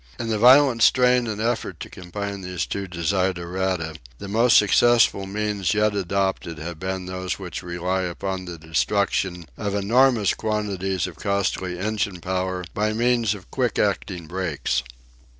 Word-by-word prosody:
In 115 -1 -3
the 110 -2 0
violent 130 0 +6
strain 125 0 +4
and 105 -1 -4
effort 115 +1 -2
to - - -5
combine 100 +2 -6
these 90 -1 -3
two 100 -1 -4
desiderata 90 -1 -1 0.2
the 100 - -8
most 115 +4 +4
successful 105 -1 +4
means 105 -1 -1
yet 105 0 +2
adopted 95 -3 -1
have 85 0 -7
been 95 0 -3
those 95 0 -4
which 90 -3 -6
rely 90 +1 -2
upon 95 +1 -4
the 85 -1 -7
destruction 90 +2 0
of 100 -2 -2
enormous 115 +1 +3
quantities 100 -4 -2
of - - -8
costly 100 -3 -1
engine 100 -1 -2
power 90 +1 -2
by 105 +1 0
means 115 -2 +2
of 95 - -14
quick 125 -4 0
acting 95 -4 -1
brakes. 85 -3 -2
95 Hz, 150 wpm, -23 LUFS, 90-105 Hz, 0.2 s, violent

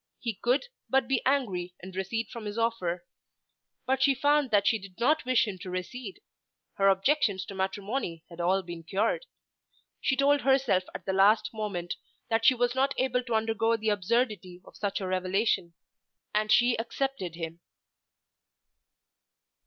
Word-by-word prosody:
He 230 -2 -2
could 245 - +1 0.2
but 265 0 +2
be 270 -2 +1
angry 190 -11 0
and 185 0 -10
recede 205 +4 -2
from 230 -2 -8
his 210 +1 -5
offer. 185 -7 -1 0.8
But 265 +1 +1
she 275 0 +4
found 290 0 +3
that 205 -2 +3
she 225 - +3
did 190 -2 -13
not 300 +5 +2
wish 255 -2 +3
him 190 -3 -5
to 185 - -7
recede. 195 +4 -6 0.5
Her 195 - +2
objections 195 0 +2
to - - -8
matrimony 195 -2 -3
had 170 0 -8
all 190 +2 +2
been 170 -1 -7
cured. 215 - -1 0.7
She 265 - +1
told 280 +1 +3
herself 265 -9 +3
at - - -7
the 190 - -1
last 210 +4 +4
moment 200 -6 -3 0.3
that 225 0 +2
she 260 - +7
was 245 0 +1
not 270 +1 +1
able 255 -1 +1
to 235 -3 -1
undergo 225 +1 +1
the 220 0 -1
absurdity 205 -3 0
of - - -16
such 200 -1 -2
a 190 - -3
revelation, 185 -1 0 0.6
and 215 0 +1
she 240 +1 +5
accepted 235 -6 -3
him. 165 0 -6
215 Hz, 160 wpm, -28 LUFS, 185-250 Hz, 0.8 s, she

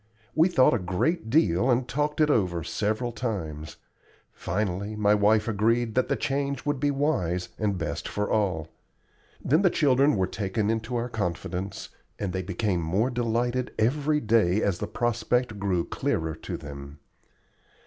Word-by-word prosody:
We 160 +3 +5
thought 130 -10 +4
a 120 - +1
great 110 - -1
deal 115 - +3
and 125 0 +2
talked 150 +3 -1
it 150 -1 +4
over 90 - +1
several 110 +7 -1
times. 85 -11 -4 0.6
Finally 100 +1 -2
my 105 -1 +3
wife 105 +1 +3
agreed 115 +2 +1
that 130 - +1
the - - +1
change 140 -1 -2
would 145 -2 0
be 145 - +1
wise 90 - 0
and 100 -3 0
best - - -3
for 105 0 -2
all. 90 -7 0 0.8
Then 155 +7 +4
the 190 - +5
children 140 -3 +3
were 95 -2 +2
taken 100 +3 -1
into 115 +2 -3
our 120 0 -1
confidence, 95 -2 -4 0.3
and 95 -3 -3
they 95 - -1
became 95 0 -1
more 95 +10 0
delighted 120 +1 -1
every 145 +6 +2
day 110 -5 +2
as 95 -4 0
the - - -3
prospect 120 -1 0
grew 95 -4 0
clearer 80 0 -2
to 80 - -6
them. 70 0 -9
110 Hz, 160 wpm, -26 LUFS, 95-125 Hz, 0.8 s, We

